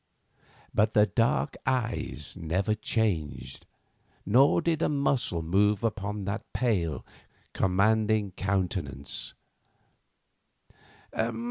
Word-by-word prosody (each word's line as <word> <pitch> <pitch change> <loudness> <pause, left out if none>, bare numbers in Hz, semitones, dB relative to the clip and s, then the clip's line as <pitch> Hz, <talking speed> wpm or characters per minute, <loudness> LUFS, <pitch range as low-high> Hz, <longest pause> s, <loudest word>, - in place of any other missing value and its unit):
But 110 +1 +2
the 105 - +6
dark 115 +3 +1
eyes 115 - -2
never 95 +4 0
changed, 100 - -2 0.6
nor 125 +8 +5
did 165 -1 0
a - - +2
muscle 140 - 0
move 100 +5 +2
upon 105 -2 -2
that 100 +3 -5
pale, 95 - 0 0.5
commanding 105 +2 +2
countenance. 90 -8 -3
105 Hz, 85 wpm, -28 LUFS, 90-115 Hz, 0.6 s, the